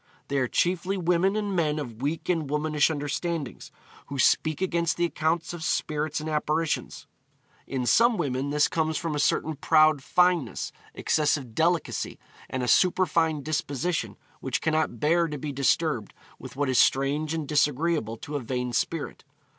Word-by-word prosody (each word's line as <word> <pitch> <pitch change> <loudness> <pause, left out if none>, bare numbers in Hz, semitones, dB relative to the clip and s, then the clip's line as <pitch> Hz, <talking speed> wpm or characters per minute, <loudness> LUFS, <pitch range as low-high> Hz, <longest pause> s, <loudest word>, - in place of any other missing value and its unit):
They 140 - +1
are 130 - +1
chiefly 180 +6 0
women 180 +2 +2
and 205 -2 -2
men 155 -3 +1
of 120 -6 -6
weak 150 +4 -2
and 165 -5 0
womanish 150 +1 +1
understandings, 150 -1 -4 0.4
who 140 - -6
speak 155 +3 +2
against 170 -3 0
the 175 - +2
accounts 165 0 -1
of 170 -2 -6
spirits 155 -1 -1
and 155 - -6
apparitions. 155 +1 -1 0.6
In 130 -2 -2
some 235 - +4
women 140 -3 -1
this 150 +1 +3
comes 160 -1 -1
from 165 -2 -3
a 150 - -2
certain 155 +1 +1
proud 155 0 +4
fineness, 180 -4 +1 0.2
excessive 145 -6 0
delicacy, 165 +5 0 0.3
and 130 -1 -3
a - - -2
superfine 165 - +2
disposition 150 - -2 0.2
which 130 -2 -2
cannot 155 -7 0
bear 170 +5 +2
to 150 -2 -5
be 145 +1 -5
disturbed 140 -3 0 0.2
with - - -10
what 145 +1 0
is 130 -1 +2
strange 145 +4 +2
and 155 -3 -4
disagreeable 150 -4 +1
to 145 +6 -7
a - - 0
vain 125 0 -3
spirit.' 160 +5 -2
155 Hz, 160 wpm, -26 LUFS, 140-165 Hz, 0.6 s, some